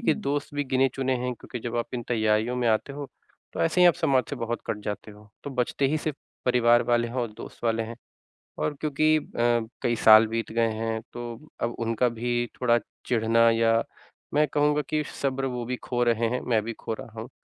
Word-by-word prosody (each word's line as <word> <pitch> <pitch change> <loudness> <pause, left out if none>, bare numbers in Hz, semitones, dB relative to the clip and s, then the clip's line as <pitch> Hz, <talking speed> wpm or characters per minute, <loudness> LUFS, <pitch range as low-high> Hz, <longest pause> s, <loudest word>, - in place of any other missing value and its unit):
कि 235 - +3
दोस्त 145 -7 -3
भी 145 0 0
गिने 130 0 +2
चुने 130 -1 0
हैं 125 +1 -2
क्योंकि 125 - -8
जब 120 +1 -4
आप 120 - 0
इन 120 - -3
तैयारियों 110 0 +1
में 125 - 0
आते 110 +5 +1
हो, 145 0 -6 0.5
तो - - -4
ऐसे 130 - +2
ही 180 - +8
आप 170 - +4
समाज 130 -2 +2
से 140 - -3
बहुत 120 -1 -3
कट 105 - -2
जाते 105 +1 -5
हो, 105 0 -16 0.2
तो 145 - -4
बचते 130 +1 0
ही 155 +3 +1
सिर्फ 155 -2 -3 0.3
परिवार 120 -1 +5
वाले 120 -1 +1
हैं 115 - -9
और 120 -3 -1
दोस्त - - -10
वाले 115 -1 +1
हैं। 115 +1 -7 0.6
और 150 - 0
क्योंकि 155 +1 +3
अ, - - -2 0.6
कई 120 - +1
साल 110 0 +9
बीत 115 0 -3
गए 115 0 +2
हैं, 110 0 -2
तो 120 +4 -7
अब 120 0 0
उनका 115 +1 +1
भी 120 +1 -1 0.2
थोड़ा 120 -2 +4 0.3
चिढ़ना 115 0 +4
या 115 0 +3 0.5
मैं 150 +1 +4
कहूँगा 150 0 +3
कि 155 0 +1 0.2
सब्र 135 -1 0
वो 125 -2 -3
भी 125 +2 -2
खो 120 -1 0
रहे 115 -1 +2
हैं, 125 +2 -2
मैं 115 -3 +1
भी 115 +2 -4
खो 115 - -5
रहा 110 0 -9
हूँ, 115 - -8
120 Hz, 220 wpm, -26 LUFS, 115-135 Hz, 0.6 s, साल